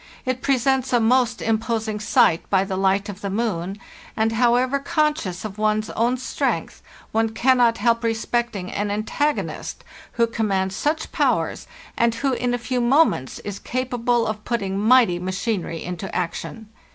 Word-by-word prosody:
It 255 Hz, 0 st, -1 dB
presents 265 Hz, -1 st, +1 dB
a 245 Hz, -, +5 dB
most 245 Hz, +1 st, +2 dB
imposing 220 Hz, -1 st, -1 dB
sight 175 Hz, -5 st, +3 dB
by 190 Hz, -1 st, +3 dB
the 195 Hz, -1 st, -3 dB
hight 195 Hz, +2 st, +2 dB
of 205 Hz, -1 st, -8 dB
the 200 Hz, -, -3 dB
moon, 195 Hz, -3 st, -2 dB, 0.4 s
and, 220 Hz, 0 st, +2 dB
however 245 Hz, +4 st, +2 dB
conscious 280 Hz, -, -1 dB
of 210 Hz, 0 st, -7 dB
one's 215 Hz, 0 st, +1 dB
own 240 Hz, +3 st, +1 dB
strength, 255 Hz, -, -2 dB, 0.3 s
one 225 Hz, 0 st, +1 dB
cannot 245 Hz, -2 st, +4 dB
help 235 Hz, 0 st, +1 dB
respecting 225 Hz, -3 st, -1 dB
an 205 Hz, 0 st, -2 dB
antagonist 225 Hz, +8 st, -2 dB, 0.3 s
who 235 Hz, -, +3 dB
commands 195 Hz, -4 st, -1 dB
such 305 Hz, +7 st, -1 dB
powers, -, -, 0 dB, 0.3 s
and 235 Hz, 0 st, +2 dB
who, 270 Hz, +2 st, 0 dB
in 245 Hz, -1 st, 0 dB
a -, -, -1 dB
few 245 Hz, +1 st, -2 dB
moments, 245 Hz, -, +2 dB
is 200 Hz, -1 st, -5 dB
capable 245 Hz, -2 st, 0 dB
of 215 Hz, -1 st, -4 dB
putting 195 Hz, -5 st, -2 dB
mighty 220 Hz, -5 st, +4 dB
machinery 185 Hz, -2 st, -3 dB
into 180 Hz, +1 st, -6 dB
action. 210 Hz, +5 st, -4 dB
225 Hz, 150 wpm, -22 LUFS, 200-245 Hz, 0.4 s, a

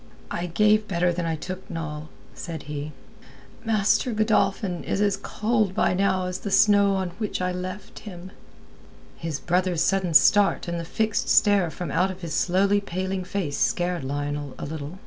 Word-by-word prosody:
"I 175 Hz, +1 st, -2 dB
gave 210 Hz, +4 st, +3 dB
better 175 Hz, -1 st, +1 dB
than 170 Hz, -1 st, -2 dB
I 165 Hz, -, -1 dB
took, 185 Hz, +4 st, -7 dB
Noll," 155 Hz, -1 st, -5 dB, 0.2 s
said 165 Hz, -4 st, -7 dB
he. 150 Hz, +1 st, -5 dB, 0.7 s
"Master 220 Hz, +2 st, +2 dB
Godolphin 200 Hz, -4 st, +1 dB
is -, -, -2 dB
as 205 Hz, -1 st, +2 dB
cold 215 Hz, -1 st, -1 dB
by -, -, +2 dB
now 190 Hz, -1 st, +1 dB
as 180 Hz, 0 st, -4 dB
the 205 Hz, -, -5 dB
snow 200 Hz, 0 st, +4 dB
on 190 Hz, -1 st, -1 dB
which 215 Hz, -2 st, -2 dB
I 180 Hz, 0 st, -1 dB
left 185 Hz, +4 st, -6 dB
him." 185 Hz, -2 st, -10 dB, 0.8 s
His 160 Hz, -3 st, -4 dB
brother's 180 Hz, 0 st, +1 dB
sudden 185 Hz, -4 st, 0 dB
start 205 Hz, +2 st, +5 dB
and 170 Hz, 0 st, -2 dB
the 170 Hz, -, -5 dB
fixed 220 Hz, +5 st, -1 dB
stare 200 Hz, -5 st, +4 dB
from 170 Hz, -2 st, -6 dB
out 185 Hz, +6 st, +2 dB
of 185 Hz, 0 st, -8 dB
his 165 Hz, -3 st, -5 dB
slowly 195 Hz, +4 st, +2 dB
paling 190 Hz, 0 st, -3 dB
face 180 Hz, -6 st, -3 dB
scared 175 Hz, -3 st, 0 dB
Lionel 145 Hz, 0 st, -4 dB
a -, -, -5 dB
little. 155 Hz, +3 st, -6 dB
185 Hz, 170 wpm, -25 LUFS, 165-200 Hz, 0.8 s, start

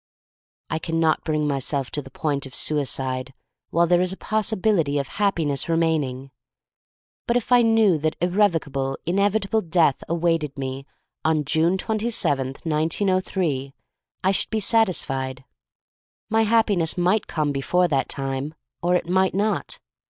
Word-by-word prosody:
I 160 Hz, -, 0 dB
can 165 Hz, 0 st, -2 dB
not 160 Hz, -1 st, +2 dB
bring 155 Hz, -1 st, 0 dB
myself 140 Hz, -1 st, -1 dB
to 145 Hz, -, -2 dB
the 135 Hz, -, -12 dB
point 140 Hz, 0 st, -2 dB
of 130 Hz, -, -10 dB
suicide 130 Hz, -3 st, -1 dB, 0.3 s
while 170 Hz, +1 st, +3 dB
there 175 Hz, +1 st, +3 dB
is 185 Hz, 0 st, 0 dB
a 190 Hz, -, -6 dB
possibility 210 Hz, -8 st, 0 dB
of 140 Hz, -1 st, -1 dB
Happiness 165 Hz, -8 st, 0 dB
remaining. 150 Hz, -6 st, 0 dB, 1.0 s
But 235 Hz, -, +3 dB
if 245 Hz, -, -4 dB
I 245 Hz, -1 st, +7 dB
knew 225 Hz, -7 st, +4 dB
that 155 Hz, +1 st, -1 dB
irrevocable, 165 Hz, -8 st, 0 dB
inevitable 200 Hz, +4 st, +1 dB
death 165 Hz, -5 st, +2 dB
awaited 165 Hz, -4 st, 0 dB
me 135 Hz, 0 st, -5 dB, 0.4 s
on 155 Hz, -2 st, +1 dB
June 160 Hz, +5 st, +2 dB
twenty 220 Hz, +3 st, -1 dB
seventh, 135 Hz, -, -1 dB
1903, 160 Hz, -3 st, 0 dB, 0.5 s
I 190 Hz, -, +3 dB
should 195 Hz, -, -1 dB
be 220 Hz, -, -1 dB
satisfied. 135 Hz, -, +1 dB, 0.9 s
My 225 Hz, 0 st, +3 dB
Happi 220 Hz, -1 st, +3 dB
ness 165 Hz, 0 st, 0 dB
might 185 Hz, +4 st, +1 dB
come 150 Hz, -3 st, -1 dB
before 175 Hz, +6 st, +1 dB
that 140 Hz, -5 st, 0 dB
time, 135 Hz, +2 st, -3 dB, 0.3 s
or 175 Hz, +1 st, +2 dB
it 180 Hz, -, -1 dB
might 190 Hz, +1 st, +2 dB
not. 210 Hz, +2 st, -1 dB
165 Hz, 145 wpm, -23 LUFS, 140-190 Hz, 1.0 s, I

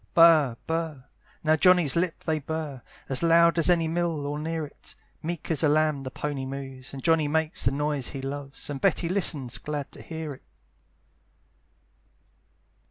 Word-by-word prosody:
Burr, 155 Hz, -8 st, +6 dB
burr 160 Hz, -5 st, -3 dB, 0.4 s
now 155 Hz, 0 st, +4 dB
Johnny's 175 Hz, -3 st, +4 dB
lips 170 Hz, 0 st, -1 dB
they 160 Hz, -1 st, 0 dB
burr, 150 Hz, -3 st, -5 dB, 0.3 s
As 135 Hz, -, +1 dB
loud 170 Hz, 0 st, +5 dB
as 165 Hz, -, +5 dB
any 170 Hz, -2 st, +3 dB
mill, 165 Hz, -3 st, -1 dB
or 145 Hz, +1 st, -3 dB
near 160 Hz, 0 st, -3 dB
it, 145 Hz, -, -13 dB, 0.3 s
Meek 170 Hz, 0 st, -4 dB
as 155 Hz, -, +2 dB
a 155 Hz, -, +4 dB
lamb 155 Hz, -1 st, +2 dB
the 130 Hz, -, -5 dB
pony 140 Hz, 0 st, -4 dB
moves, 135 Hz, -1 st, -7 dB
And 135 Hz, -1 st, -8 dB
Johnny 160 Hz, -2 st, +3 dB
makes 160 Hz, +1 st, -1 dB
the 120 Hz, -, +3 dB
noise 145 Hz, -2 st, 0 dB
he 135 Hz, -, -5 dB
loves, 140 Hz, 0 st, -5 dB
And 135 Hz, -, -5 dB
Betty 180 Hz, -3 st, +2 dB
listens, 155 Hz, -9 st, +1 dB
glad 145 Hz, -2 st, -5 dB
to -, -, -11 dB
hear 160 Hz, -2 st, -6 dB
it. 130 Hz, -, -15 dB
155 Hz, 165 wpm, -26 LUFS, 140-165 Hz, 0.4 s, Burr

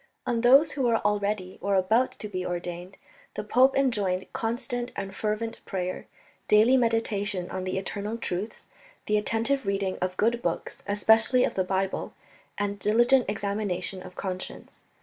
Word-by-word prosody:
On 235 Hz, -1 st, 0 dB
those 275 Hz, +6 st, +6 dB
who 285 Hz, -, -4 dB
were 235 Hz, -3 st, +3 dB
already, 205 Hz, -2 st, -1 dB
or 200 Hz, 0 st, +1 dB
about 220 Hz, +7 st, +2 dB
to 210 Hz, -, -7 dB
be 185 Hz, -3 st, -4 dB
ordained, 175 Hz, +1 st, -5 dB, 0.4 s
the -, -, -3 dB
pope 255 Hz, +5 st, +4 dB
enjoined 205 Hz, -9 st, 0 dB
constant 240 Hz, +1 st, -3 dB
and 195 Hz, -1 st, -5 dB
fervent 215 Hz, +2 st, -3 dB
prayer, 185 Hz, -2 st, -4 dB, 0.4 s
daily 220 Hz, +5 st, +5 dB
meditation 215 Hz, -6 st, 0 dB
on 185 Hz, 0 st, -4 dB
the 185 Hz, -, -2 dB
eternal 205 Hz, +3 st, -4 dB
truths, 200 Hz, -1 st, -4 dB, 0.4 s
the 210 Hz, -, +1 dB
attentive 225 Hz, +4 st, 0 dB
reading 195 Hz, -1 st, -1 dB
of 185 Hz, 0 st, -2 dB
good 235 Hz, +2 st, +1 dB
books, -, -, -3 dB
especially 220 Hz, +5 st, +5 dB
of -, -, 0 dB
the 190 Hz, -, 0 dB
Bible, 190 Hz, +1 st, -2 dB, 0.4 s
and 205 Hz, 0 st, -2 dB
diligent 240 Hz, +4 st, +3 dB
examination 200 Hz, -3 st, -2 dB
of 180 Hz, 0 st, -11 dB
conscience. 185 Hz, -1 st, -6 dB
205 Hz, 150 wpm, -27 LUFS, 190-230 Hz, 0.4 s, those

